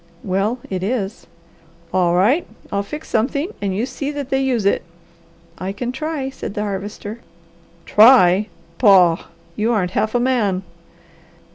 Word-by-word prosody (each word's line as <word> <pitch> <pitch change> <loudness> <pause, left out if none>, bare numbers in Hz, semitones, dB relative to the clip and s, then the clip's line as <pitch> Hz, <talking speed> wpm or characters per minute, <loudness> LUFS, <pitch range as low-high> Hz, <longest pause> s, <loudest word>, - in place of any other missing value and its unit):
"Well, 195 +5 0
it 185 -2 -3
is." 205 0 -3 0.7
"All 175 -2 +2
right 235 - +3 0.2
I'll 200 - 0
fix 300 +10 -8
something, 280 - 0
and 195 -2 -1
you 225 - 0
see 280 +1 -5
that 285 -2 -5
they 270 0 +2
use 250 -6 0
it." 200 - +2 0.8
"I 185 +1 -3
can 240 +5 -4
try," 275 0 -3
said 215 - -7
the 210 - -2
Harvester. 205 +2 -5 0.7
"Try! 210 -4 +6 0.3
Pah! 185 -7 +5 0.3
You 220 +3 0
aren't 190 -6 0
half 215 +4 -1
a - - +4
man!" 225 -7 +1
215 Hz, 145 wpm, -20 LUFS, 195-255 Hz, 0.8 s, Try